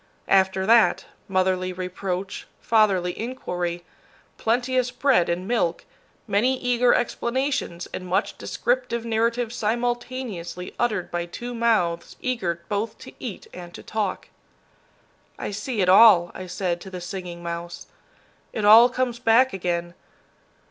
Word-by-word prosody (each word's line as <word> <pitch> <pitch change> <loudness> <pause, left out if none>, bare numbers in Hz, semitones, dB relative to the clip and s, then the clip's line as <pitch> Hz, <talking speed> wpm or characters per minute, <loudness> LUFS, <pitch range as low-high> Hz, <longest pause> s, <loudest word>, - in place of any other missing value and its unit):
After 190 0 +3
that, 230 +2 +4 0.2
motherly 185 -1 +1
reproach, 185 +1 -4
fatherly 195 -6 +2
inquiry, 175 -8 -4 0.5
plenteous 250 +2 +1
bread 250 -8 +2
and 180 +2 -2
milk, 190 -8 0 0.4
many 250 +6 +2
eager 245 0 +3
explanations 245 -6 -1
and 185 - -5
much 190 +4 0
descriptive 240 -2 -1
narrative 230 +1 0
simultaneously 235 -6 -3
uttered 215 -7 -1
by 175 0 -2
two 240 +7 -7
mouths 215 -8 0
eager 180 -10 -2
both 215 +2 -2
to - - -12
eat 230 -7 -6
and 175 -1 -10
to - - -10
talk. 210 -4 -3 1.1
"I - - -4
see 210 +2 -3
it 185 - +2
all," 185 -3 +7
I 185 - -7
said 175 -1 -2
to 190 - -9
the 185 -1 -6
Singing 175 -1 -7
Mouse. 170 0 -6 0.7
"It 210 - -2
all 225 +4 +9
comes 250 -1 -2
back 245 +2 +4
again. 175 -2 -2
205 Hz, 130 wpm, -24 LUFS, 180-240 Hz, 1.1 s, all